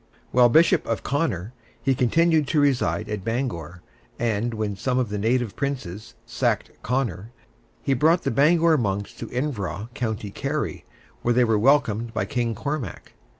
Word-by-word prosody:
While 125 -1 +6
Bishop 165 +5 +4
of 115 - -2
Connor, 125 - -1 0.3
he 135 - +1
continued 155 +4 +3
to 155 - +2
reside 110 - +1
at 105 -3 -4
Bangor, 95 - -3 0.3
and 115 0 0
when 105 -2 -2
some 125 +6 -1
of 125 -4 0
the 105 0 -3
native 115 -1 0
princes 115 -8 -4
sacked - - -1
Connor, 115 -5 -2 0.5
he 135 - +2
brought 160 +7 +3
the - - 0
Bangor 160 +4 +4
monks 100 -2 -2
to - - -7
Iveragh, 115 -6 -3
County 110 -4 -3
Kerry, 145 +7 -3 0.4
where 120 0 +1
they 125 - +5
were 110 -3 +2
welcomed 115 -3 +2
by 95 - 0
King 115 +2 -1
Cormac. 140 - -5
120 Hz, 155 wpm, -24 LUFS, 105-140 Hz, 0.5 s, While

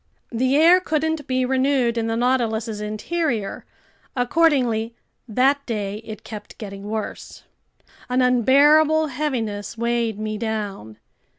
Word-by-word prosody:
The 255 +3 +1
air 335 +4 +6
couldn't 315 -3 -1
be 255 0 +1
renewed 260 -2 +1
in 230 -1 -1
the 225 0 -1
Nautilus's 230 -3 0
interior. 215 +1 -3 0.5
Accordingly, 245 -5 +1 0.3
that 265 +5 +2
day 205 -3 -3
it 220 -1 -9
kept 210 -2 -9
getting 200 -2 -8
worse. 220 -1 -6 0.7
An 250 +1 +1
unbearable 295 +5 +4
heaviness 235 -7 -3
weighed 235 -2 -1
me 215 0 -4
down. 205 - -4
235 Hz, 115 wpm, -22 LUFS, 215-275 Hz, 0.7 s, air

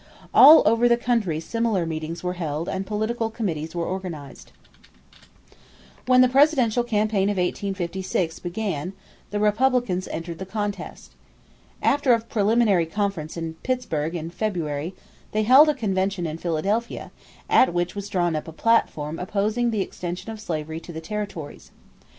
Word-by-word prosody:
All 310 +2 +9
over 230 +3 +4
the 235 - +4
country 230 -10 0
similar 220 0 -1
meetings 160 +1 -5
were 180 0 -1
held 160 -2 -3
and 190 0 -3
political 220 +2 -1
committees 170 -8 -4
were 170 -1 -1
organized. 175 -7 -6 1.6
When 255 0 +6
the 255 - +6
presidential 255 -3 +3
campaign 210 -3 +1
of 205 - -1
1856 185 -2 -2
began 180 -2 -3 0.4
the 205 - -2
Republicans 210 -3 +1
entered 165 0 -6
the 190 - -5
contest. 205 -2 -5 0.7
After 280 -3 +3
a - - -1
preliminary 215 -5 +2
conference 180 -4 -3
in 165 -1 -4
Pittsburgh 170 -11 -2
in 165 0 -5
February, 170 -4 -3 0.4
they 215 0 +1
held 265 +7 +7
a 300 - +1
convention 195 -5 -1
in 160 0 -4
Philadelphia 195 +8 -2 0.4
at 260 - +5
which 175 0 -1
was 200 0 -6
drawn 175 -4 0
up 155 - -4
a - - -7
platform 160 -6 +1
opposing 210 +6 0
the 220 -3 0
extension 180 +2 -5
of 220 -1 -8
slavery 160 -4 -4
to 170 - -11
the 160 - -6
territories. 195 -4 -6
195 Hz, 145 wpm, -24 LUFS, 170-225 Hz, 1.6 s, All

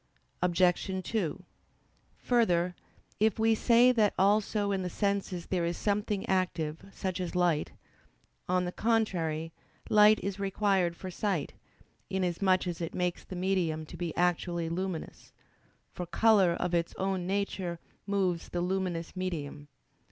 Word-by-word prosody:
Obj. 180 +2 +2
2: 185 -5 -2 0.7
Further, 180 -8 +2 0.5
if 215 -1 +3
we 225 0 +3
say 235 +3 +5
that 220 -4 +2
also 205 +1 +2
in 195 -1 0
the 180 - -3
senses 200 -2 -1
there 180 -2 -1
is 170 0 -1
something 205 -1 -1
active, 165 -4 -1
such 185 -1 -3
as 180 -1 -4
light: 175 -4 +1 0.8
on 180 0 +2
the 180 - -3
contrary, 175 -8 0 0.4
light 210 0 +7
is 200 0 -3
required 195 -3 +1
for 185 +1 -7
sight, 185 -5 -2 0.6
inasmuch 185 0 +1
as 175 -1 -4
it 165 - -4
makes 180 -1 -1
the 185 - -8
medium 175 -4 0
to 165 - -11
be 170 -1 -3
actually 175 -1 0
luminous; 180 -1 -5 0.6
for 180 - -6
color 200 -2 +4
of 180 +1 -2
its 170 -1 0
own 190 -2 -1
nature 190 -3 -2 0.3
moves 190 -4 0
the 175 - -2
luminous 180 -2 -2
medium. 155 -6 -4
185 Hz, 135 wpm, -30 LUFS, 170-200 Hz, 0.8 s, light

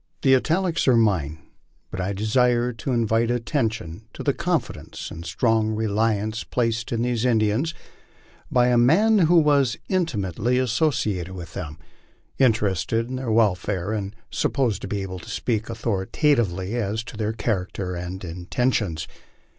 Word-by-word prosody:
The 135 -1 +6
italics 170 +5 +1
are 130 - +6
mine, 90 -9 +1 0.5
but 95 - -3
I 95 +2 -1
desire 120 +4 +2
to 115 +4 -4
invite 115 -1 +1
attention 115 - -2
to - - -7
the - - +2
confidence - - -3
and 85 - -7
strong 110 +3 +1
reliance 110 0 0
placed 115 -2 -1
in 115 -1 0
these 120 -2 0
Indians 120 +6 +1 0.8
by 125 -1 +4
a 120 -1 +4
man 205 - +5
who 175 -1 +4
was 145 -6 +3
intimately 125 - 0
associated 115 - 0
with 85 -3 -8
them, 80 -5 -6 0.6
interested 110 - +1
in 130 - -3
their 130 -2 -4
welfare, 100 -3 +1
and 105 -1 -3 0.2
supposed 125 -7 0
to - - -5
be 100 0 -2
able 95 -1 -6
to 80 - -12
speak 110 -2 -2
au 115 - -4
thoritatively 105 - 0
as 110 -2 -1
to 120 - -10
their 110 0 -1
character 95 -4 -2
and 90 +2 -6
intentions. 90 -1 -1
110 Hz, 145 wpm, -24 LUFS, 95-125 Hz, 0.8 s, The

